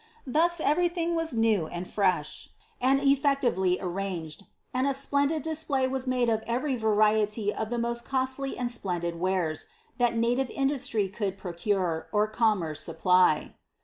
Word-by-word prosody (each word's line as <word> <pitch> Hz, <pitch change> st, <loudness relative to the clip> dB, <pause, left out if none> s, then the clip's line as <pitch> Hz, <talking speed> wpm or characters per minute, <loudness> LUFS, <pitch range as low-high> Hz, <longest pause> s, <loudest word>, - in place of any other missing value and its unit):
Thoi 305 Hz, +6 st, +3 dB, 0.2 s
everylhing 340 Hz, +2 st, +1 dB
was 330 Hz, -3 st, -1 dB
new 220 Hz, -7 st, +2 dB
and 175 Hz, +2 st, -6 dB
fresh, 185 Hz, -7 st, -1 dB, 0.3 s
and 265 Hz, +2 st, +3 dB
effectively 275 Hz, -10 st, +2 dB
arranged; 180 Hz, -2 st, -5 dB, 0.3 s
and 255 Hz, +2 st, +1 dB
a 275 Hz, -, +1 dB
splendid 285 Hz, +2 st, +1 dB
display 305 Hz, -4 st, +1 dB
was 260 Hz, 0 st, -3 dB
made 250 Hz, -1 st, +1 dB
of 220 Hz, -1 st, +1 dB
every 255 Hz, +4 st, 0 dB
variety 215 Hz, -1 st, +2 dB
of 220 Hz, -, -4 dB
the 240 Hz, -, -2 dB
most 235 Hz, 0 st, -2 dB
costly 265 Hz, +1 st, -2 dB
and 245 Hz, -1 st, -2 dB
splendid 175 Hz, -7 st, -3 dB
wares, 180 Hz, -4 st, 0 dB, 0.3 s
that 240 Hz, -1 st, +2 dB
native 245 Hz, +3 st, +1 dB
industry 270 Hz, -6 st, 0 dB
could 195 Hz, -1 st, -3 dB
produce, 180 Hz, -2 st, -2 dB
or 210 Hz, 0 st, +2 dB
commerce 210 Hz, -8 st, 0 dB
supply. 180 Hz, -4 st, +2 dB
230 Hz, 145 wpm, -27 LUFS, 190-270 Hz, 0.3 s, Thoi